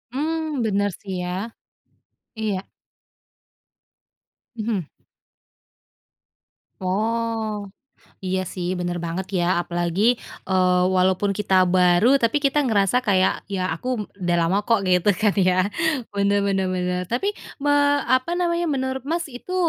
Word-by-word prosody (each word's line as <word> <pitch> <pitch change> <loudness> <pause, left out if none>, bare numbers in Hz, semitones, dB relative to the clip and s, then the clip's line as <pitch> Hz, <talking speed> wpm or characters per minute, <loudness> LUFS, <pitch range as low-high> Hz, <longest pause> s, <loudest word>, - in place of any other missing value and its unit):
Mmm, 310 -3 -1
bener 205 -2 +1
sih 195 -2 -7
ya, 190 +6 -4 0.9
iya. 200 -3 -1 1.9
Mhm. 215 -7 -2 1.9
Oh, 220 +2 -1 0.5
iya 185 -1 -2
sih 180 0 -3
bener 175 -1 -3
banget 175 +3 -3
ya 175 0 +2
apalagi, 175 +2 -2 0.5
eee, 180 -1 +3
walaupun 185 +2 +2
kita 195 -2 +2
baru 185 +8 +4
tapi 240 +5 +1
kita 280 0 +2
ngerasa 205 +1 +2
kayak 195 -6 +1
ya 185 -2 -2
aku 240 +2 -4
udah 175 -2 0
lama 170 +4 +2
kok 230 -4 +3
gitu 185 +2 +3
kan 210 +1 +2
ya 185 +1 +3 0.4
bener 200 0 +1
bener 195 -1 +1
bener 180 0 -1
tapi 250 - 0 0.3
me 290 - +2 0.4
apa 255 +7 +2
namanya 345 -1 0
menurut 265 -3 -2
Mas 335 -1 -2
itu, 255 +9 -7
200 Hz, 120 wpm, -23 LUFS, 185-240 Hz, 1.9 s, baru